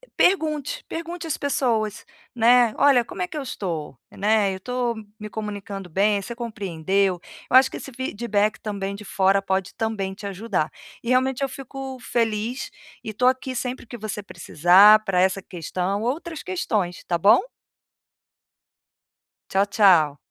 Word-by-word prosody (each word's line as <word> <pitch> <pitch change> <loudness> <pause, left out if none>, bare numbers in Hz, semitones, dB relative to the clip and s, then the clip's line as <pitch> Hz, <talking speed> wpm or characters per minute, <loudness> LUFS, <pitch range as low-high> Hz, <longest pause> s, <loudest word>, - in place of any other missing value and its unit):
pergunte, 310 -6 +1
pergunte 335 +1 -6
às 315 - -1
pessoas, 235 -6 -1 0.3
né, 240 -1 +5
"Olha, 275 -4 +5
como 250 - -8
é 360 - 0
que 345 - -10
eu - - -2
estou? 170 - -5
Né, 205 -1 +1
eu - - -5
estou 245 +3 -2
m 220 -1 -9
me 210 0 -7
comunicando 205 -3 -6
bem, 200 +4 +2
você 235 - -6
compreendeu?". 195 -5 -1 0.3
Eu 255 - +8
acho 260 0 +6
que - - -9
esse 270 - -8
feedback 220 -4 -1
também, 200 -2 -4
de 205 - -10
fora, 195 0 +2
pode 190 -1 -2
também 210 -4 -2
te 200 +2 -10
ajudar. 195 -5 -2 0.3
E 235 - -4
realmente 255 +1 +2
eu 270 - 0
fico 270 0 -7
feliz, 230 +1 -2 0.3
e - - -5
estou 220 +4 +1
aqui 260 0 0
sempre 250 0 -4
que 240 - -9
você 210 -2 -5
precisar, 190 +4 +5
pra 190 -3 0
essa 190 +1 +2
questão, 185 +3 -3
outras 310 +6 -3
questões, 220 - -2
tá 175 - 0
bom? 205 +8 +6 2.1
Tchau, 195 +1 +2
tchau. 180 -8 +4
215 Hz, 155 wpm, -23 LUFS, 195-255 Hz, 2.1 s, Eu